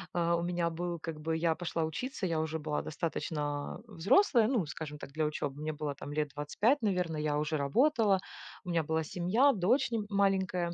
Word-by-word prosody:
э, 170 0 +2
у 170 - -1
меня 175 -1 0
был, 170 0 -3
как 155 -1 -6
бы 160 +1 -1
я 165 -1 +2
пошла 170 -2 -2
учиться, 190 - -3
я 165 -2 0
уже 160 0 -2
была 150 0 -2
достаточно, 145 -2 -3
а, - - -11
взрослая. 220 - +4
Ну, 230 - +1
скажем 150 -1 -6
так, - - -9
для 155 +1 0
учёбы 145 -1 -3
мне 155 0 -2
было 145 -2 -4
там 145 - -8
лет 150 -1 0
25, 215 - +1
наверное, 180 -7 0
я 150 -1 0
уже 150 +1 0
работала, 210 - +3 0.4
у 180 - -8
меня 165 -2 +1
была 160 +1 0
семья, 210 - +3
дочь 235 +7 +2
нь 220 -3 -1
маленькая. 190 -3 +1
170 Hz, 200 wpm, -32 LUFS, 155-195 Hz, 0.4 s, взрослая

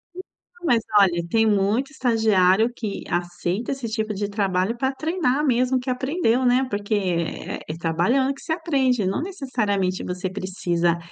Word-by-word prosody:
Então, 355 -1 -13
mas 240 -5 +4 0.2
olha, 170 -3 +3
tem 225 +4 +3
muito 210 +7 +1
estagiário 220 -5 +3
que 215 -5 -5
aceita 175 +5 -2
esse 265 -4 -4
tipo 220 -1 -2
de 205 0 -3
trabalho 200 +1 0
para 265 +2 0
treinar 305 -2 0
mesmo 255 0 +2
o - - 0
que 255 +1 -5
aprendeu, 260 -1 +1
né? 250 +2 +3
Porque 205 0 -3
é 175 -5 -2
é 155 - -5
trabalhando 180 +12 +1
que 275 - -15
você 320 - -2
aprende. 270 - +1
Não 190 +8 -1
necessariamente, 215 - -1
você 180 +1 -3
precisa, 175 -3 -1
220 Hz, 160 wpm, -23 LUFS, 185-260 Hz, 0.2 s, mas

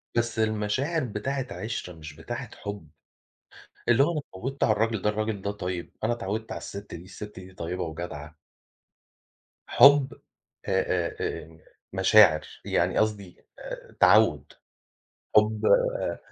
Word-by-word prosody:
بس 120 -1 0
المشاعر 110 +9 0
بتاعة 130 +4 -3
عِشرة 105 -5 -5
مش 75 -2 -10
بتاعة 120 - -6
حُب، 100 -7 -7 1.0
اللي 120 +2 +5
هو 160 +5 +2
أنا 155 - -2
اتعوّدت 135 +3 -4
على - - +4
الراجل 110 -1 0
ده، 105 - +2
الراجل 105 -1 -3
ده 100 - -1
طيب، 90 -3 -5
أنا - - +2
اتعوّدت 110 0 -4
على - - -4
الست 100 +1 -8
دي، 85 - -9
الست 105 +3 -9
دي 95 0 -13
طيّبة 90 +1 -4
وجدعة. 80 -2 -7 1.3
حُب 140 -1 +6 0.5
آآ - - -3
آآ - - -1
آآ 80 0 -6 0.4
مشاعر 95 -4 +6 0.2
يعني - - +1
قصدي 105 -4 -2
آآ - - -9
تعوّد، - - +4 0.8
حُب 105 0 +3
آآ - - +2
105 Hz, 135 wpm, -27 LUFS, 90-120 Hz, 1.3 s, حُب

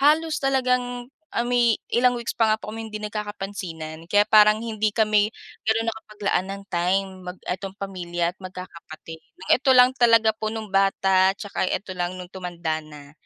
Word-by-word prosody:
halos 310 +2 +3
talagang, 250 -2 0 0.3
ah, 235 - +1
may 240 -2 +3 0.2
ilang 250 +1 +4
weeks 235 -1 -3
pa 225 - +3
nga 215 - 0
kaming 225 +1 -7
hindi 215 - -5
nagkakapansinan. 195 -7 -6
Kaya 205 0 +6
parang 215 0 +6
hindi 215 -2 -1
kami 215 -1 +3 0.4
ganun 225 +1 +1
nakapaglaan 210 -4 -3
ng 200 0 -7
time 185 +3 +1 0.2
mag 180 - -20
'etong 190 +1 -3
pamilya 175 -3 -2
at - - -49
magkakapatid. 170 -3 -10 0.2
Ng - - -11
eto 265 +1 +3
lang 250 0 +7
talaga 230 -2 +5
po 215 0 -3
nung 220 -2 -5
bata 195 -1 +3
tsaka 205 -2 -3
'eto 190 -2 -3
lang 175 0 -2
nung 180 0 -9
tumanda 170 -4 -3
na, 145 -1 -13
205 Hz, 165 wpm, -24 LUFS, 185-230 Hz, 0.4 s, lang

